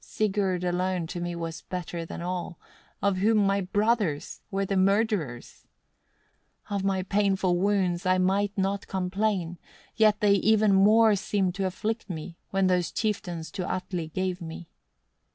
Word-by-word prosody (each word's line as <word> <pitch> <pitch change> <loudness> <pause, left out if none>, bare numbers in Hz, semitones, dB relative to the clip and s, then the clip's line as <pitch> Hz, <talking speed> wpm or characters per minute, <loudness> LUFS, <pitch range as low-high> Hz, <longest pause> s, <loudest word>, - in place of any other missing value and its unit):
Sigurd 195 -4 -1
alone 180 0 0
to 175 +1 -5
me 175 0 -3
was 165 -1 -5
better 175 -2 -5
than 170 - -6
all, 175 -1 -4 0.5
of 200 -2 +2
whom 215 +4 +3
my 200 -1 +2
brothers 205 -4 0
were 195 0 -1
the 195 - -1
murderers. 195 - 0 1.0
11. - - 0
"Of 195 - -1
my 190 -1 0
painful 190 -2 +1
wounds 190 -3 +1
I 185 0 +4
might 195 +2 +1
not 195 +1 -1
complain; 190 -2 -1 0.4
yet 215 -1 +4
they 205 -1 +4
even 215 +1 +4
more 215 +3 +6
seemed 195 -2 0
to 190 +1 -1
afflict 215 +4 -3
me, 165 0 -6
when 195 -1 +1
those 180 -2 +1
chieftains 180 -7 -3
to 190 -3 -3
Atli 180 -3 -3
gave 185 +3 -3
me. 165 0 -8
190 Hz, 150 wpm, -27 LUFS, 180-205 Hz, 1.0 s, more